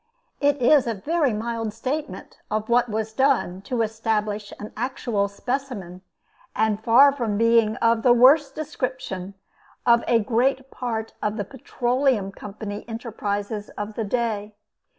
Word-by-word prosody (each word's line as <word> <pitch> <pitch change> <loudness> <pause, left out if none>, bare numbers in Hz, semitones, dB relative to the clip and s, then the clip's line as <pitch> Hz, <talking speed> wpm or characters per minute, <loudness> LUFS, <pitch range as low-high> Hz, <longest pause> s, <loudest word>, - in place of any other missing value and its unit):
It 285 0 +3
is 255 +1 +5
a 230 - -1
very 295 - +1
mild 225 0 -3
statement 275 +7 -5
of 215 +1 -2
what 240 0 +3
was 220 0 -3
done 260 -8 +1
to 230 +3 -1
establish 215 -2 -2
an 210 - -8
actual 240 -6 -1
specimen, 200 -5 -4 0.5
and 220 0 +1
far 260 +5 +7
from 235 -7 -2
being 230 -1 +4
of 230 -1 +2
the 245 - +5
worst 270 +4 +5
description 255 -10 -4 0.5
of 235 -1 +5
a 235 - +4
great 255 +4 0
part 225 -3 -4
of 210 +1 -1
the 205 - -2
Petroleum 250 -4 0
Company 205 +1 -7
enterprises 210 -2 -4
of 210 +1 -4
the 225 - -3
day. 215 -1 -2
230 Hz, 140 wpm, -24 LUFS, 210-255 Hz, 0.5 s, far